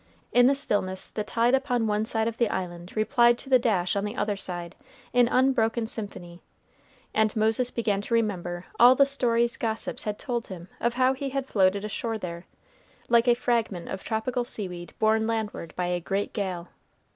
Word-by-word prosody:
In 245 0 +6
the 275 - +4
stillness, 195 -8 -1
the 215 - -3
tide 235 +3 +1
upon 250 -4 +1
one 210 0 0
side 220 0 0
of 230 0 -4
the 235 -3 +3
Island 175 -2 -5
replied 235 +2 +4
to 265 - -10
the 255 - +7
dash 200 -8 +1
on 200 - 0
the 210 +2 -4
other 210 -4 -1
side 175 -3 -4 0.4
in 245 -1 +5
unbroken 235 -3 +2
symphony, 180 -6 -7 0.7
and 220 -1 +2
Moses 220 +3 +2
began 210 -5 -1
to 230 +3 -1
remember 180 -5 -1
all 245 +2 +8
the 280 - +6
stories 235 -4 +1
gossips 220 -1 -3
had 210 -1 -2
told 240 -4 -3
him 180 -1 -9
of 235 0 0
how 255 +1 +3
he 275 +1 -4
had 270 0 -2
floated 200 -3 +2
ashore 225 +2 -3
there, 170 -3 -7 0.6
like 235 +1 +4
a 240 - +6
fragment 230 -7 -1
of 190 - -5
tropical 240 +3 -1
seaweed 180 -7 -6
borne 220 0 +2
landward 220 -7 -3
by 180 - -1
a 175 0 -1
great 195 +4 -2
gale. 185 -5 -3
220 Hz, 185 wpm, -26 LUFS, 190-240 Hz, 0.7 s, all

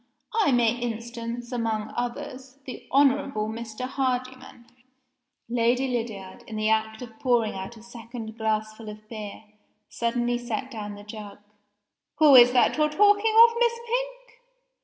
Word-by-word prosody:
I 435 -9 +3
may 235 -3 +3
instance 235 +1 -5
among 225 -3 -2
others, 255 +2 -5
the 255 - -9
Honorable 275 -5 +2
Mr. 225 0 -7
Hardyman 255 -2 -3 0.4
" 250 - -53 0.2
Lady 240 +2 +1
Lydiard, 225 -6 -5
in 220 - -7
the 215 0 0
act 220 +1 0
of 225 -2 -12
pouring 240 -4 +1
out 190 +5 -7
a 220 - -14
second 230 -1 -9
glassful 215 0 -2
of 215 0 -11
beer, 215 -2 -8 0.5
suddenly 240 +1 -1
set 240 +2 -4
down 210 -3 -6
the 205 - -11
jug. 210 -1 -9 0.8
"Who 300 -2 +6
is 245 -1 +9
that 250 - +3
you're 305 0 +3
talking 410 +6 +3
of, 465 - -6
Miss 475 -1 +3
Pink?" - - -4
240 Hz, 145 wpm, -26 LUFS, 220-260 Hz, 0.8 s, is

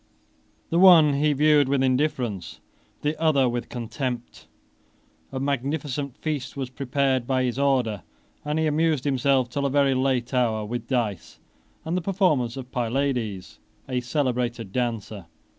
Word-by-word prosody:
The 170 - +2
one 170 -6 +7
he 150 +2 +2
viewed 145 -1 +4
with 135 -1 +2
indifference, 125 - -1 0.4
the 150 +1 0
other 145 -5 +3
with 120 0 -3
contempt. 120 0 -5 0.8
A 130 - -4
magnificent 140 0 -2
feast 145 -4 -4
was 130 -2 -4
prepared 135 -1 0
by 130 -1 +1
his 125 +1 -2
order, 125 -8 +1 0.4
and 150 +1 -2
he 160 - +1
amused 155 -2 +1
himself, 135 -2 +2
till 140 +3 -1
a - - -1
very 140 0 +3
late 130 -1 0
hour, 115 -4 +1
with 120 +2 -5
dice, 115 -9 -2 0.5
and 165 +2 -2
the 180 - 0
performances 165 - +1
of 130 -1 -8
Pylades, 120 -5 -2 0.3
a 130 -1 -1
celebrated 125 -4 -2
dancer. 110 -6 -3
130 Hz, 140 wpm, -25 LUFS, 120-145 Hz, 0.8 s, one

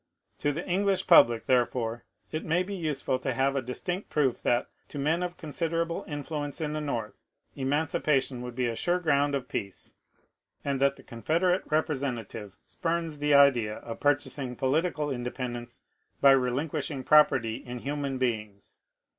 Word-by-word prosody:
To 145 - +1
the 160 +5 -5
English 195 +1 +1
public, 115 -1 +6
therefore, 120 -2 0 0.3
it 155 - -3
may 170 +3 +1
be 200 +2 -6
useful 155 -7 -1
to 130 -1 -2
have 135 +2 +1
a 135 - +1
distinct 175 +10 -4
proof 135 -5 +1
that, 120 0 +1 0.2
to - - -8
men 155 +5 +1
of 180 0 -3
considerable 165 +1 -2
influence 145 0 -4
in 150 -2 -2
the 155 - -2
North, 120 -7 -4 0.3
emanci 145 +3 0
pation 135 -4 +1
would 125 -1 -7
be 125 0 0
a 115 -1 -1
sure 175 +8 +1
ground 145 -4 +2
of 130 -2 -3
peace, 100 -5 -5 0.7
and 140 -1 0
that 140 0 +3
the - - -16
Confed 155 +9 -1
erate 180 0 +1
representative 130 - -2
spurns 165 -3 -3
the 145 0 +3
idea 125 -7 +5
of 115 +1 -8
purchasing 145 -3 0
political 150 +3 0
independence 120 -1 -5 0.4
by 140 - +7
relinquishing 135 +2 0
property 130 -6 +4
in 125 0 -7
human 140 +1 -3
beings. 110 -5 -3
140 Hz, 160 wpm, -28 LUFS, 125-155 Hz, 0.7 s, by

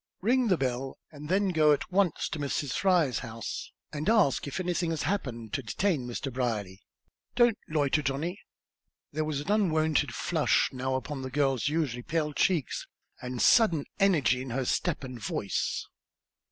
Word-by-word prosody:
"Ring 245 +5 +2
the 185 -4 +3
bell, 130 0 -2
and 150 0 -9
then 195 +2 +2
go 155 -4 +5
at 145 - -3
once 185 -4 +2
to 155 - -4
Mrs. 140 -1 -2
Fry's 175 -9 +2
house, 115 -3 -6 0.2
and 150 +5 -1
ask 205 - +3
if 140 - -4
anything 175 -2 0
has 160 -2 -2
happened 125 - -3
to 135 - 0
detain 140 - -1
Mr. 125 +2 -4
Brierly. 105 -7 -2 0.5
Don't 240 -2 +4
loiter, 150 -1 +2
Johnny." 150 +8 -2 0.7
There 155 +1 -1
was 150 -2 -2
an 150 - -3
unwonted 160 -7 +2
flush - - +2
now 130 +1 -1
upon 135 +2 -4
the 130 - -4
girl's 135 -2 +1
usually 150 -6 -1
pale 150 +2 -1
cheeks, 165 -3 0 0.3
and 125 0 -5
sudden 175 -11 +5
energy 155 -11 +3
in 130 - -6
her 130 +2 -1
step 175 +1 0
and 125 -2 -7
voice. 100 -1 -2
145 Hz, 165 wpm, -29 LUFS, 130-175 Hz, 0.7 s, go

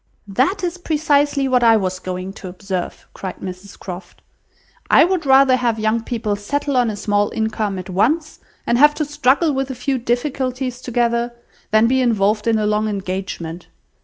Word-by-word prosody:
"That 265 - 0
is 355 0 -2
precisely 290 -4 +1
what 250 -2 +2
I 225 -1 +6
was 185 -2 -2
going 185 +1 -5
to 195 - -9
observe," 185 0 -5
cried 190 -2 -6
Mrs 185 +1 -9
Croft. 180 -1 -9 0.7
"I - - +7
would 355 -4 -1
rather 265 -1 +6
have 235 -3 0
young 220 +1 0
people 225 -4 -2
settle 280 +7 -2
on 245 -2 +3
a 215 - -3
small 205 0 0
income 215 -2 -1
at 185 0 -7
once, 290 - 0 0.3
and 235 - +1
have 295 +1 +6
to 305 - -1
struggle 290 +2 +2
with 270 0 -2
a 265 - -4
few 260 +2 -1
difficulties 255 +1 -2
together, 235 -1 0 0.3
than 215 +1 +4
be 260 +2 +2
involved 215 -2 +1
in 225 -1 +3
a 215 - 0
long 210 +1 +1
engagement. 185 -4 -5
230 Hz, 175 wpm, -19 LUFS, 200-270 Hz, 0.7 s, I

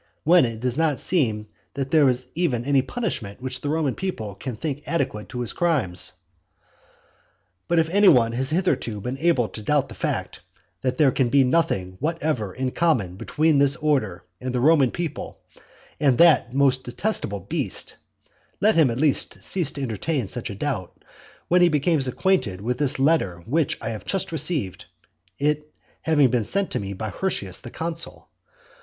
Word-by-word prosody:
when 170 -1 +6
it 115 -2 -4
does 125 +4 -1
not 155 -5 +1
seem 110 -12 0 0.3
that 135 -1 -3
there 150 -4 +5
is 125 0 -1
even 130 -9 0
any 140 -1 +3
punishment 130 - -4
which 130 0 -4
the 145 - -3
Roman 150 -4 0
people 115 - -4
can 120 +5 -6
think 145 +4 -4
adequate 135 -10 -2
to 125 - -4
his 120 - -2
crimes? 135 - 0 1.5
But 170 - +1
if 160 -1 +3
any 200 +4 +4
one 120 -8 +6
has 130 +3 0
hitherto 145 - 0
been 125 +6 -5
able 160 -8 +2
to 110 - -7
doubt 140 +5 +1
the - - -9
fact, - - -3 0.4
that 130 -1 -1
there 145 -4 +5
can 125 -1 +1
be 135 +2 +5
nothing 125 - 0
whatever 150 - -1
in 130 +4 -3
common 125 - +1
between 155 +8 +1
this 140 0 +4
order 130 - 0 0.2
and 125 0 -4
the - - +1
Roman 140 -1 +5
people 165 0 -5 0.6
and 135 -5 +3
that 170 -9 +5
most 135 -1 +2
detestable 120 - -2
beast, 95 - -4 0.6
let 215 +2 +4
him 160 -5 +4
at 115 - -3
least 145 0 0
cease 175 -7 -1
to 140 - -5
entertain 130 +2 -2
such 120 +5 -5
a 100 - -6
doubt, 115 -6 -4 0.5
when 180 +1 +4
he 175 - +6
becomes 150 -2 +2
acquainted 125 - 0
with 120 +5 -2
this 145 -2 +1
letter 130 - +1
which 150 +6 0
I 115 - -4
have 110 -2 -6
just 195 -3 -1
received, 150 - -1 0.5
it 150 +1 -1 0.3
having 145 -6 +3
been 120 -3 +1
sent 195 - 0
to - - -1
me 100 0 -5
by 110 +3 -4
Hirtius 100 - -3
the - - -9
consul. 165 +4 -5
135 Hz, 175 wpm, -24 LUFS, 115-160 Hz, 1.5 s, when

